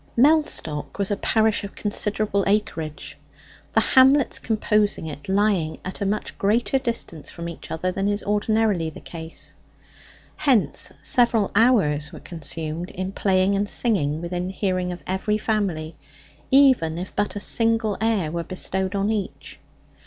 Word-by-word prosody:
Mellstock 270 - +2
was 200 0 -1
a - - +2
parish 220 +1 +1
of 200 - -8
considerable 205 -1 -1
acreage, 170 -7 -2 0.5
the - - +5
hamlets 265 +1 +4
composing 210 -4 +1
it 150 +2 -8
lying 190 -5 +1
at 185 - -6
a 200 - 0
much 210 +2 -3
greater 235 +6 +2
distance 230 - -4
from 170 0 -7
each 170 - -9
other 180 +3 -2
than 195 +2 -1
is 205 0 -1
ordinarily 210 -4 +1
the 155 - -11
case. 165 -1 -7 0.8
Hence 265 -9 +2
several 235 -4 +3
hours 185 - +3
were 165 - -10
consumed 160 +1 -5
in 185 +1 -4
playing 190 0 +2
and 200 +1 0
singing 160 - +1
within 175 +1 -3
hearing 185 -2 -1
of 175 - -8
every 190 +3 -1
family, 190 -8 -2 0.5
even 260 - +4
if 180 +2 -6
but 205 0 -1
a - - -3
single 225 -1 +2
air 215 -8 +1
were 170 0 -3
bestowed 190 +2 -2
on 200 +2 +1
each. 205 -4 -5
200 Hz, 145 wpm, -23 LUFS, 170-215 Hz, 0.8 s, the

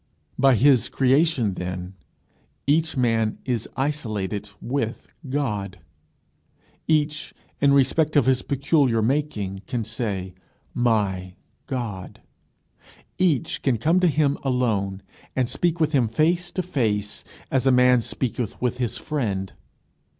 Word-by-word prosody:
By 135 -1 +5
his 130 +1 +4
creation, 135 - +2
then, 90 0 -5 0.7
each 155 +1 +1
man 115 -3 +1
is 120 -4 -2
isolated 110 -8 -2
with 120 -2 -3 0.2
God; 105 -9 -2 1.1
each, 150 -1 0 0.2
in 140 0 +4
respect 150 +4 +2
of 145 - +5
his 130 -1 +3
peculiar 140 -4 +1
making, 110 -8 -1
can 125 -4 -2
say, 100 -4 -4 0.4
"my 100 -6 0 0.3
God;" 115 -8 -5 1.0
each 165 -9 +1
can 130 -4 +1
come 160 - +2
to 180 - +4
him 150 -2 +1
alone, 105 -7 0 0.3
and 130 -2 +1
speak 170 +5 -1
with 155 -2 +2
him 130 -6 +3
face 170 +9 +1
to 185 - -1
face, 110 - -1 0.3
as 130 0 +1
a - - +6
man 125 -1 +5
speaketh 120 -1 -3
with 125 0 -1
his 120 -2 -1
friend. 110 -8 -3
125 Hz, 120 wpm, -24 LUFS, 105-145 Hz, 1.1 s, a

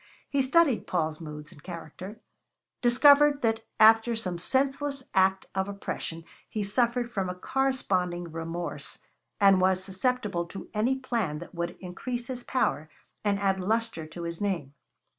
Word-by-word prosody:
He 280 - +3
studied 275 -1 +3
Paul's 160 -2 -1
moods 150 0 -8
and 150 - -15
character, 180 +5 -8 0.6
discovered 285 +3 +6
that 225 -1 +1 0.2
after 225 +2 +6
some 185 -6 -3
senseless 275 +5 0
act 190 0 +3
of 190 +1 -1
oppression 165 -4 -5 0.3
he 215 -2 -2
suffered 240 +3 +1
from 195 -5 -1
a 180 - -4
corresponding 180 -8 -1
remorse, 165 +1 -4 0.4
and 195 -2 +6
was 185 0 +3
susceptible 195 -2 -1
to 195 - -9
any 230 +5 +2
plan 230 - -2
that 170 +2 -10
would 170 0 -4
increase 240 +7 -5
his 250 -1 -4
power 155 - 0 0.3
and 205 -1 +2
add 195 -1 +1
lustre 220 -4 -1
to 170 +2 -8
his 170 +1 -5
name. 170 -9 -2
195 Hz, 145 wpm, -28 LUFS, 175-240 Hz, 0.6 s, discovered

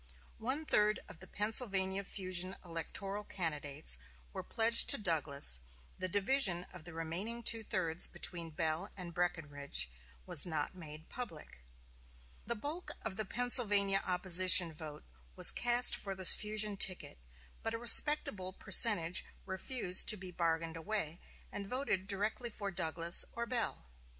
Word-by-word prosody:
One 265 +7 -5
third 210 -5 0
of 160 - -14
the - - -12
Pennsylvania 200 -3 -2
fusion 185 -1 -2
electoral 195 +5 -7
candidates 150 - -4 0.3
were - - -7
pledged 230 +1 +2
to - - +6
Douglas; 150 - -1 0.4
the 185 - -2
division 195 -2 +1
of 175 -4 -14
the 175 - -10
remaining 180 +9 -7
two 225 0 +5
thirds 175 -5 -3
between 170 -2 -7
Bell 160 +4 -5
and 175 -2 -9
Breckinridge 145 - -2 0.3
was 145 - -1
not 155 -3 -5
made 160 -3 -12
public. 170 - -10 0.9
The 235 - -4
bulk 295 +10 -6
of 190 - -6
the 215 - -5
Pennsylvania 205 -4 +2
opposition 180 -1 +4
vote 150 -1 -11 0.3
was - - +8
cast 240 +1 +2
for 195 -1 -7
this 185 -1 +10
fusion 210 -1 -1
ticket, 185 - +4 0.4
but 225 0 -6
a - - -5
respectable 230 -6 +5
percentage 185 -5 +3 0.2
refused 190 0 -2
to 215 - +4
be 185 -1 -11
bargained 165 -1 -4
away, 170 -2 -5 0.3
and 200 -1 -8
voted 210 -6 -5
directly 210 +4 -1
for 200 -3 -8
Douglas 170 -1 0
or 235 - -6
Bell. 235 - -4
190 Hz, 140 wpm, -32 LUFS, 165-215 Hz, 0.9 s, this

